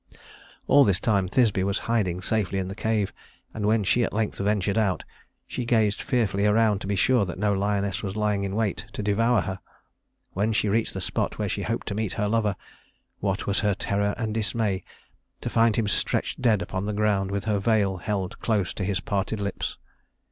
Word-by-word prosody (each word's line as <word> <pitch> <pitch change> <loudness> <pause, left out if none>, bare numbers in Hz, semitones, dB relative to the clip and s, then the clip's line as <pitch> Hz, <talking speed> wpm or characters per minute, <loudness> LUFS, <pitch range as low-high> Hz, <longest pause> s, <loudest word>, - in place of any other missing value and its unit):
All 145 0 +6
this 100 -7 +2
time 100 -3 +1
Thisbe 105 -1 +2
was 100 0 0
hiding 95 -6 0
safely 100 -2 0
in 95 -1 -2
the - - -4
cave, 110 -1 -1 0.4
and 105 -2 -2
when 110 0 +3
she 120 +5 +3
at - - -2
length 110 0 -1
ventured 100 0 +1
out, 105 -5 +1 0.4
she 125 - -4
gazed 110 -3 +2
fearfully 105 -6 +1
around 105 -1 +3
to - - -5
be 100 - 0
sure 125 +2 +3
that 90 -2 -4
no 105 +1 +1
lioness 100 -1 0
was 100 -2 -4
lying 105 -2 0
in 100 0 -3
wait 110 -4 -1
to 105 - -4
devour 110 +2 +3
her. 95 +2 -4 0.7
When 105 +4 +1
she 105 -1 +1
reached 110 +2 0
the - - -3
spot - - -2
where - - -1
she - - -2
hoped - - -2
to - - -2
meet 105 -2 -2
her 105 - -1
lover, 105 -2 +1 0.6
what 100 0 -1
was 100 0 +1
her 105 -2 +1
terror 100 +1 0
and 110 -3 -2
dismay 110 -3 -1 0.6
to - - -4
find 115 -1 +4
him 110 -2 +1
stretched 100 - 0
dead 110 -7 +3
upon 95 +3 -3
the 105 - -1
ground 100 -2 +1
with 100 0 -2
her 105 -2 0
veil 100 -3 +2
held 95 +3 -3
close 105 -6 0
to 100 - -4
his 95 -2 -1
parted 100 +1 -2
lips. 100 -1 -3
105 Hz, 205 wpm, -26 LUFS, 100-110 Hz, 0.7 s, All